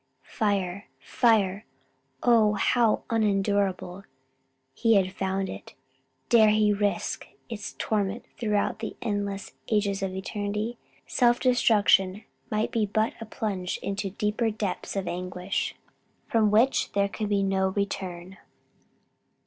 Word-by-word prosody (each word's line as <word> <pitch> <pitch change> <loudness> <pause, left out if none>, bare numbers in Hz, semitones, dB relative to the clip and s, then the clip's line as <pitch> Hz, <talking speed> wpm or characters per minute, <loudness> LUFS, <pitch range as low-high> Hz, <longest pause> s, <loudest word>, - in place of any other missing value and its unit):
Fire, 200 -3 -1
fire! 215 -5 +2 0.6
oh 225 -3 +5
how 220 +2 +2
unendurable 200 -3 0 0.7
he 225 - +3
had 190 -1 +2
found 190 0 -1
it! - - -9 0.5
dare 220 -2 +6
he 210 -1 +3
risk 205 0 -1 0.2
its 215 -3 -6
torment 210 +1 -1
throughout 210 -2 0
the 220 - -5
endless 200 -2 -3 0.2
ages 205 -2 +1
of 190 -1 -2
eternity? 210 +4 -3 0.3
Self 240 -1 +3
destruction 210 -5 +3 0.3
might 215 0 0
be 220 -2 +1
but 215 +2 0
a 225 - -6
plunge 195 -5 -3
into 195 0 -2
deeper 210 +3 0
depths 205 -3 -4
of 195 -2 -2
anguish: 180 +1 -3 0.5
from 220 -2 +3
which 225 +6 +3
there 200 0 +2
could 210 +1 -4
be 200 -1 +2
no 190 0 +1
return. 190 -1 -4
205 Hz, 120 wpm, -27 LUFS, 195-220 Hz, 0.7 s, dare